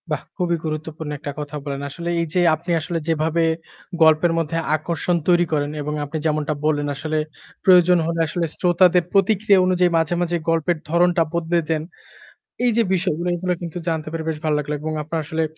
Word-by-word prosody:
বাহ! - - -1 0.2
খুবই 175 -2 +1
গুরুত্বপূর্ণ 155 0 -5
একটা 145 - -5
কথা 150 0 -6
বলেন। 140 -1 -4
আসলে 170 +4 -5
এই 170 - +1
যে 180 - +3
আপনি 170 +3 -6
আসলে 170 +2 -3
যেভাবে 165 +1 +1 0.6
গল্পের 160 +2 +5
মধ্যে 165 0 -1 0.2
আকর্ষণ 170 +2 -1
তৈরি 175 -1 +4
করেন 145 -1 0
এবং 150 +1 -3
আপনি 145 +3 -5
যেমনটা 155 -1 0
বললেন, 145 -1 +1
আসলে 155 +2 -3 0.5
প্রয়োজন 180 -1 +6
হলে 165 0 -2
আসলে 170 +2 -1
শ্রোতাদের 180 0 +4
প্রতিক্রিয়া 200 0 +4
অনুযায়ী 180 -1 +2
মাঝে, 160 +1 +1
মাঝে 175 0 0
গল্পের 165 +1 +1
ধরনটা 175 +1 +3
বদলে 170 0 +1
দেন। 155 -1 0 0.8
এই 245 - +4
যে 230 - +5
বিষয়গুলো 175 -2 -1
এগুলো 180 +1 -1
কিন্তু 175 0 -6
জানতে 160 -2 -1
পেরে 165 0 -4
বেশ 160 - -2
ভাল 155 - +2
লাগলো 150 0 -3
এবং 155 +1 -3
আপনার 160 +2 -3
আসলে 160 +2 -1
165 Hz, 180 wpm, -21 LUFS, 155-175 Hz, 0.8 s, প্রয়োজন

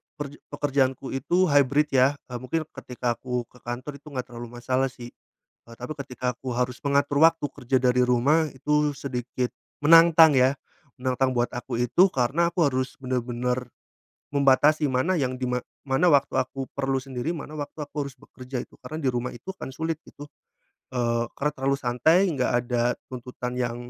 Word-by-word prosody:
perje 145 -1 -7
pekerjaan 140 -2 +1
ku 135 - -8
itu 175 +8 +1
hybrid 145 +1 +4
yah, 135 +2 +4 0.2
eee, 125 - -3
mungkin 145 +6 -2
ketika 125 -1 -3
aku 125 -1 -2
ke 125 - -18
kantor 130 +4 -6
itu 150 - -20
enggak 130 -4 -5
terlalu 120 0 -7
masalah 130 +2 0
sih. 120 -2 -10 0.5
Eee, 115 - -13
tapi 125 +5 -5
ketika 125 -3 -4
aku 130 +1 -6
harus 125 +1 -1
mengatur 140 +1 +2
waktu 165 -2 +5
kerja 130 0 -1
dari 125 0 +3
rumah 140 +6 +3
itu 150 +2 +1
sedikit 125 -2 -3 0.3
menantang 165 0 +7
ya. 130 +2 +3 0.4
Menantang 130 0 +1
buat 120 -1 +1
aku 120 0 -4
itu 150 +11 +4
karena 145 +7 +1
aku 165 -4 +3
harus 130 0 -2
bener-bener 125 -1 -2 0.6
membatasi 145 +2 +4
mana 130 +9 +1
yang 130 -1 -1
dima 125 -1 -1 0.3
mana 135 +7 +3
waktu 140 -3 +3
aku 135 +1 -4
perlu 135 -1 -1
sendiri, 130 +5 -3
mana 150 0 -8
waktu 150 0 -5
aku 145 -1 -4
harus 135 - -15
bekerja 125 0 -7
itu - - -23
karena 155 - -7
di - - +3
rumah 120 +1 -2
itu 155 +11 -8
kan - - -7
sulit 160 -1 -2
itu, 145 - -10 0.7
eee, 120 -1 0
karena 150 +1 0
terlalu 135 0 0
santai 140 +9 +3
enggak 130 -3 0
ada 120 0 0 0.2
tuntutan 125 0 -5
yang 120 -1 -1
130 Hz, 175 wpm, -25 LUFS, 125-145 Hz, 0.7 s, menantang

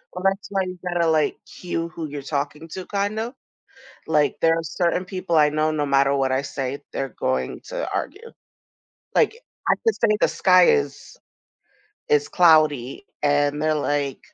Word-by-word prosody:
Well, 180 - -6
that's 195 -1 0
why 195 - +1
you 185 0 -6
gotta, 175 -1 +1
like, 155 -1 +1
cue 170 -2 -5
who 160 0 -6
you're 145 -1 -6
talking 145 +3 -4
to, 185 +3 -7
kind 205 +1 -2
of, 230 +3 -4 0.7
like, 150 -2 +2
there 165 0 +4
are 165 - -3
certain 175 +3 -1
people 185 -3 -2
I 150 -1 +5
know, 155 +1 0
no 150 -1 -1
matter 140 0 +3
what 135 -1 +1
I 130 - +1
say, 135 0 -4
they're 135 -1 -3
going 130 0 -2
to - - -4
argue. 465 0 -5 0.8
Like, - - +3 0.3
I - - +5
could 450 - +3
say 210 -2 +2
the - - +4
sky 185 -1 +5
is, 445 +2 0 0.9
it's 445 -1 +2
cloudy, 155 - +3 0.2
and 145 0 +2
they're 155 0 +1
like, 145 -2 -1
160 Hz, 170 wpm, -23 LUFS, 145-185 Hz, 0.9 s, I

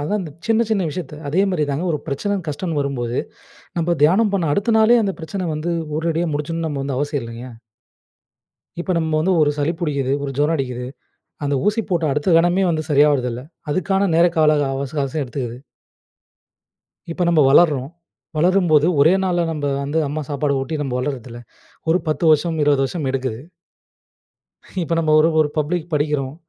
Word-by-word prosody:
அதான் 205 +8 -1
இந்த 160 - -7 0.2
சின்ன 225 0 +3
சின்ன 205 -3 +2
விஷயத்தை 150 -2 -6
அதே 180 +7 +2
மாரி 165 -5 0
தாங்க, 145 +6 -2
ஒரு 150 - -1
பிரச்சனைனு 190 +6 -2
கஷ்டம்னு 150 +1 -3
வரும்போது, 125 -4 -2 0.6
நம்ப 170 +1 +1
தியானம் 195 +7 +4
பண்ண 170 -6 0
அடுத்த 205 +7 +1
நாளே, 220 +2 +6
அந்த 195 -2 -1
பிரச்சனை 180 +3 -4
வந்து 155 +3 -3 0.3
உடனடியா 165 +1 -1
முடிச்சுடணும்னு 160 +2 -2
நம்ப 140 -2 -3
வந்து 140 -2 -3
அவசியம் 145 -2 -2
இல்லைங்க. 115 +2 -8 1.3
இப்ப 185 +1 -1
நம்ம 160 -1 0
வந்து 185 +4 +2
ஒரு 145 - +4
சளி 145 +3 +1
புடிக்குது. 140 -5 -1
ஒரு 140 - -3
ஜுரம் 150 +3 +2
அடிக்குது. 125 -2 -4 0.6
அந்த 145 0 0
ஊசி 215 +2 +2
போட்ட 170 -2 +1
அடுத்த 150 +4 +1
கணமே 175 +3 +2
வந்து 155 -2 -1
சரியாவுறதில்ல. 135 -4 +3 0.3
அதுக்கான 195 +4 +1
நேர 170 - +6
கால 150 -1 +4
அவச 135 +1 -4
அவகாசம் 145 +2 -3
எடுத்துக்குது. 125 -2 -5 1.6
இப்ப 180 - -3
நம்ப 165 -3 +4
வளர்றோம். 145 -3 +4 0.5
வளரும்போது 170 -3 +3
ஒரே 160 +5 +6
நாள்ல 175 -2 +1
நம்ப 150 -2 -3 0.2
வந்து, 145 +3 -1
அம்மா 150 +2 -3
சாப்பாடு 140 0 0
ஊட்டி, 155 +4 -3
நம்ப 135 -3 -3
வளர்றதில்ல. 125 -3 -5 0.5
ஒரு 170 +3 +4
10 155 +2 -1
வருஷம், 160 +2 +1
20 145 -2 +3
வருஷம் 150 0 -3
எடுக்குது. 130 -3 -3 1.4
இப்ப 165 0 -1
நம்ம 155 -2 +1
ஒரு 160 - +4
ஒரு 150 - +2
பப்ளிக்குக்கு 160 +2 -1
படிக்கிறோம். 145 -2 -1
155 Hz, 165 wpm, -20 LUFS, 140-175 Hz, 1.6 s, நாளே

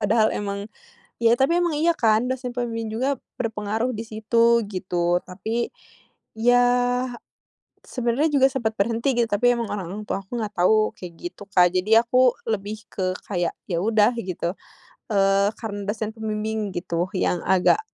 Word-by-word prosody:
padahal 215 +1 +3
emang 200 0 -3 0.5
ya, 230 0 +4
tapi 305 +6 +3
emang 350 -1 +1
iya 330 +3 +2
kan 225 +2 +3
dosen 255 -1 -3
pembimbing 230 -3 -3
juga 265 +5 0 0.2
berpengaruh 220 +1 -1
di 225 - -5
situ 230 +2 +3
gitu. 175 -2 0
Tapi, 220 +6 -3 0.7
ya, 245 +2 +5 1.2
sebenarnya 250 +5 0
juga 265 - +6
sempat 235 -5 -1
berhenti 230 +6 +1
gitu, 235 - +3
tapi 235 +4 +3
emang 235 -2 -2
orang 195 -5 -4 0.2
tua 195 - -2
aku 215 +6 -6
enggak 210 -2 -4
tahu 215 +5 +3
kayak 180 -2 -8 0.2
gitu, 190 - -12
Kak, 180 -1 +5
jadi 215 +5 +4
aku 255 +1 +5 0.2
lebih 215 0 -3
ke 185 -1 -1 0.2
kayak, 175 -4 -1 0.2
ya 170 -3 -1
udah 220 +1 +3
gitu, 180 -4 -3 0.6
eee, 195 0 +3
karena 205 -3 -5
dosen 215 0 -2
pembimbing 215 -1 -3
gitu 175 0 -2
yang 180 -1 0
agak 190 - +4
220 Hz, 155 wpm, -23 LUFS, 200-235 Hz, 1.2 s, juga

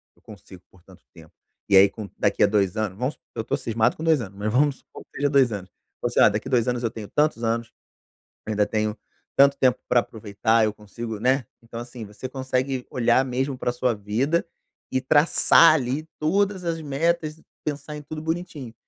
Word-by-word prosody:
eu - - -29
consigo 95 -3 -14
por 95 - -22
tanto 95 +1 -19
tempo". 80 -3 -16 0.4
E 100 - +5
aí 100 +1 +8
com 105 -1 -8
daqui - - 0
à - - +6
2 100 -3 +1
anos. 105 -3 -2
Vamos 130 +6 -1
su - - -38 0.2
eu 110 - -3
tô 125 - -1
cismado 115 -3 0
com 160 - -8
2 160 -3 +3
anos, 100 -4 -8
mas 105 +1 -2
vamos 140 +3 +2
supor - - -14
que - - -70
seja 145 0 +1
2 135 -4 +4
anos, 95 -3 -6 0.3
você: - - 0
"Ah, - - +7
daqui 105 +4 -3
à - - -7
2 120 -2 +2
anos 125 -1 -1
eu 115 - 0
tenho 110 -2 -8
tantos 150 -4 0
anos, 115 +1 -1 0.7
ainda 105 -1 +1
tenho 110 0 -1 0.4
tanto 140 0 +6
tempo 130 -2 +2
pra 120 - +4
aproveitar, 110 +1 0
eu 105 - -1
consigo", 105 +1 -7
né. 130 +1 +2 0.2
Então 115 0 -8
assim, 120 -1 -8
você 105 +5 -8
consegue 130 0 -2
olhar 120 +1 +3
mesmo 130 +1 -2
pra 125 - -1
sua 125 0 0
vida 115 +11 0 0.5
e 130 - +1
traçar 155 +4 +5
ali 140 +2 -2
todas 190 +4 0
as 165 -1 -2
metas, 155 +2 -1 0.2
pensar 150 0 -5
em 150 - -7
tudo 155 +1 -7
bonitinho. 160 -6 -4
125 Hz, 205 wpm, -24 LUFS, 110-145 Hz, 0.7 s, aí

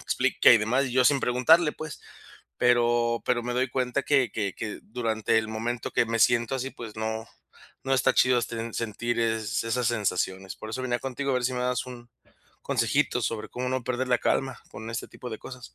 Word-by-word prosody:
explica - - +3
y 120 - +6
demás, 125 +6 +1
y 125 - -5
yo 130 0 +4
sin 140 -1 +4
preguntarle, 150 +6 +4
pues. 155 -3 -8 0.6
Pero 120 -1 +2
pero 120 -1 +1
me 120 - -3
doy 130 +1 +1
cuenta 130 +2 -1
que 135 -5 +2
que 100 -4 -2
que 105 -2 -6
durante 110 -1 -1
el 110 0 -2
momento 115 +2 -3
que 115 - +2
me 115 0 -1
siento 120 +2 +3
así, 135 +1 -3
pues 110 -3 -9
no 110 +1 -3 0.6
no 135 - +2
está 130 - +3
chido, 125 -1 +4
este, 115 -1 -4
sentir 115 +1 -2
es 110 -2 -1
esas 120 +2 0
sensaciones. 95 -4 -2
Por 110 - -8
eso 130 +3 -4
venía 120 -1 0
contigo 135 +1 -3
a - - +1
ver 125 - 0
si 130 - +1
me 125 - -2
dabas 125 +1 0
un 120 -1 -10 0.5
consejito - - +1
sobre 110 -2 -3
cómo 125 +1 -4
no 130 -1 -1
perder 125 0 -2
la 125 -2 +3
calma 135 0 0
con 110 +1 -8
este 115 - -5
tipo 125 - -9
de 110 - -5
cosas. 125 -2 -11
120 Hz, 210 wpm, -27 LUFS, 115-125 Hz, 0.6 s, y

